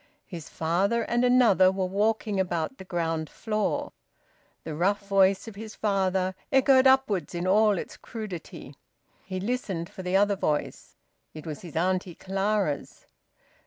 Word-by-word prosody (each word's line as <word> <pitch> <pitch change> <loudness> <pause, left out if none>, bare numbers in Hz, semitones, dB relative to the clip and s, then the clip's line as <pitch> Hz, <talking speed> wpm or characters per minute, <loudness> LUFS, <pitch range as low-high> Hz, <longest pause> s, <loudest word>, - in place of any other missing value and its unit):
His 165 -5 -9
father 195 +8 0
and 240 +1 0
another 235 -7 +5
were 190 0 -1
walking 210 +1 0
about 175 +5 -2
the - - -7
ground 165 -3 -2
floor; 215 -2 -2 0.7
the 160 - -5
rough 200 +5 0
voice 195 +1 +3
of 225 - -7
his 215 +2 -9
father 190 -2 0 0.2
echoed 265 0 +5
upwards 260 -10 +2
in 175 +1 -2
all 210 +1 +4
its - - -6
crudity. 195 - -8 0.5
He 185 -1 -5
listened 195 -6 -3
for - - -8
the 180 +1 +1
other 200 0 +3
voice; 150 -6 -3 0.4
it 155 - -9
was 155 -3 -6
his 170 -3 -11
Auntie 180 +1 0
Clara's. 195 -5 -2
195 Hz, 145 wpm, -27 LUFS, 175-215 Hz, 0.7 s, another